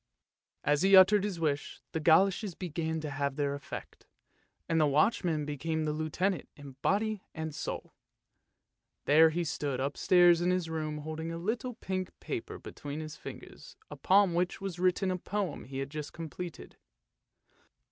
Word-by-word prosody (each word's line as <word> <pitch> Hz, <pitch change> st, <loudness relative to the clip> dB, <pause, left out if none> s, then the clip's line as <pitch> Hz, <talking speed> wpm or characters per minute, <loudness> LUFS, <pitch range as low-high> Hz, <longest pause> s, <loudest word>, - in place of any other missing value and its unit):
" -, -, -56 dB
As 150 Hz, -, +1 dB
he 195 Hz, +1 st, +6 dB
uttered 190 Hz, +2 st, +7 dB
his 200 Hz, -5 st, -3 dB
wish 145 Hz, -3 st, -1 dB
the 160 Hz, -, -2 dB
goloshes 185 Hz, +4 st, +3 dB
began 160 Hz, -2 st, -3 dB
to 150 Hz, -1 st, -4 dB
have 140 Hz, 0 st, -2 dB
their 140 Hz, -1 st, 0 dB
effect, 140 Hz, -1 st, -8 dB, 0.6 s
and 165 Hz, -1 st, +2 dB
the 150 Hz, -, +4 dB
watchman 155 Hz, +1 st, +2 dB
became 155 Hz, +2 st, -2 dB
the 150 Hz, -1 st, -1 dB
Lieutenant 160 Hz, +4 st, -1 dB
in 145 Hz, -1 st, -10 dB
body 215 Hz, 0 st, +1 dB
and 160 Hz, -1 st, -4 dB
soul. -, -, -5 dB, 1.1 s
There 160 Hz, +3 st, +7 dB
he 170 Hz, +2 st, -1 dB
stood 145 Hz, -4 st, -2 dB
upstairs 175 Hz, +5 st, +4 dB
in 175 Hz, -, +2 dB
his 180 Hz, -3 st, 0 dB
room 155 Hz, -1 st, -3 dB
holding 160 Hz, +2 st, -5 dB
a 165 Hz, -, -4 dB
little 225 Hz, +7 st, -3 dB
pink 185 Hz, -4 st, -4 dB
paper -, -, -5 dB
between 145 Hz, +1 st, -7 dB
his 155 Hz, -1 st, -6 dB
fingers -, -, -11 dB
upon 195 Hz, -1 st, +3 dB
which 175 Hz, +1 st, 0 dB
was 195 Hz, -3 st, -5 dB
written 185 Hz, +1 st, +2 dB
a 185 Hz, -, -2 dB
poem 200 Hz, 0 st, -3 dB
he 135 Hz, 0 st, -7 dB
had 135 Hz, +1 st, -4 dB
just 150 Hz, -1 st, -6 dB
completed. 165 Hz, +1 st, -7 dB
165 Hz, 160 wpm, -31 LUFS, 150-185 Hz, 1.1 s, uttered